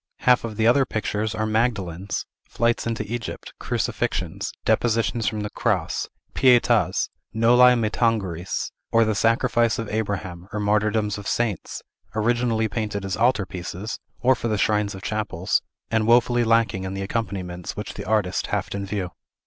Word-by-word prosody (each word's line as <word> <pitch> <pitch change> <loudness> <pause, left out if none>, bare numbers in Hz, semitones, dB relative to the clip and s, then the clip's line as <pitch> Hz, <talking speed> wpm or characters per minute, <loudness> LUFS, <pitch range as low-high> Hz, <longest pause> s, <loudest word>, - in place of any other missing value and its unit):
Half 125 -1 +4
of 110 -2 -5
the 110 - +2
other 125 +4 +5
pictures 110 -2 -2
are 110 - -1
Magdalens, 100 -5 -1 0.2
Flights 115 0 +1
into 115 -1 -1
Egypt, 120 +1 -5
Crucifixions, - - -2
Depositions 115 -1 +1
from 105 +2 -1
the 105 - -4
Cross, - - -1 0.3
Pietas, 120 -7 +3 0.2
Noli 125 +3 +6
me 110 -3 0
tangeres, 95 -8 -1 0.2
or 115 0 +5
the 110 - +1
Sacrifice 115 +2 +2
of 115 - -3
Abraham, 95 -5 -3
or 105 - -3
martyrdoms 105 0 +1
of 100 - -7
saints, 115 -7 -2 0.3
originally 115 0 +1
painted 105 -2 -3
as 95 -2 -2
altar 115 -2 +2
pieces, 90 +4 -6 0.2
or 130 +2 +5
for 120 - -3
the 110 -2 0
shrines 105 0 +1
of 95 - -10
chapels, 100 -4 -1 0.3
and 110 -1 +2
woefully 120 0 +4
lacking 115 -5 +1
the 95 - -3
accompaniments 95 -5 -4
which - - -5
the - - -7
artist 105 -4 0
haft - - -2
in 100 0 -4
view. 95 -3 -3
110 Hz, 155 wpm, -24 LUFS, 100-115 Hz, 0.3 s, Noli